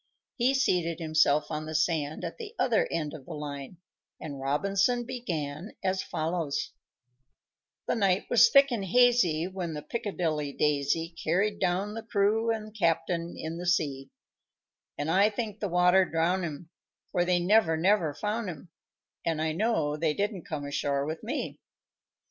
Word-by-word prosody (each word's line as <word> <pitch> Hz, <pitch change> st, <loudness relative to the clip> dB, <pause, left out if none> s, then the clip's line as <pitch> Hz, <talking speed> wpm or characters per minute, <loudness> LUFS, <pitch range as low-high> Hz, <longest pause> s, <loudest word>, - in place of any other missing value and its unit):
He 255 Hz, +2 st, +2 dB
seated 175 Hz, -10 st, +1 dB
himself 155 Hz, -2 st, +2 dB
on 155 Hz, 0 st, -3 dB
the 155 Hz, -, -5 dB
sand 155 Hz, -2 st, 0 dB
at -, -, -6 dB
the 455 Hz, 0 st, -8 dB
other 235 Hz, -4 st, +2 dB
end 155 Hz, -3 st, -2 dB
of 140 Hz, -4 st, -10 dB
the -, -, -6 dB
line, 145 Hz, +2 st, -6 dB, 0.4 s
and 145 Hz, -3 st, -7 dB
Robinson 195 Hz, -, +1 dB
began 175 Hz, -, -4 dB
as 190 Hz, 0 st, 0 dB
follows: 160 Hz, -2 st, -2 dB, 1.2 s
_The -, -, +1 dB
night 195 Hz, -4 st, +2 dB
was 240 Hz, -, +6 dB
thick 275 Hz, 0 st, +6 dB
and 225 Hz, -5 st, -1 dB
hazy 200 Hz, -7 st, +4 dB
When 180 Hz, -3 st, -4 dB
the 150 Hz, -, -6 dB
"Piccadilly 160 Hz, -7 st, -2 dB
Daisy" 150 Hz, +4 st, 0 dB
Carried 200 Hz, +6 st, +1 dB
down 190 Hz, +4 st, 0 dB
the 225 Hz, -, -5 dB
crew 220 Hz, +1 st, +1 dB
and 215 Hz, -1 st, -3 dB
captain 170 Hz, -2 st, 0 dB
in 160 Hz, +1 st, -5 dB
the 180 Hz, -, -5 dB
sea; 140 Hz, -6 st, 0 dB, 0.9 s
And 145 Hz, +2 st, -1 dB
I 195 Hz, +4 st, +5 dB
think 215 Hz, -1 st, -4 dB
the 205 Hz, -, -2 dB
water 180 Hz, +2 st, +5 dB
drowned 175 Hz, +2 st, 0 dB
'em; 160 Hz, +1 st, -7 dB, 0.4 s
For 175 Hz, -2 st, +2 dB
they 180 Hz, 0 st, +2 dB
never, 175 Hz, -2 st, +3 dB
never 170 Hz, -3 st, +2 dB
found 210 Hz, +4 st, -2 dB
'em, 170 Hz, +1 st, -9 dB, 0.5 s
And 165 Hz, -2 st, -1 dB
I 160 Hz, 0 st, 0 dB
know 160 Hz, -5 st, 0 dB
they 155 Hz, -1 st, 0 dB
didn't 200 Hz, -3 st, -2 dB
come 150 Hz, -3 st, -4 dB
ashore 140 Hz, -1 st, -1 dB
with 160 Hz, +2 st, -4 dB
me. -, -, -4 dB
175 Hz, 160 wpm, -28 LUFS, 155-205 Hz, 1.2 s, was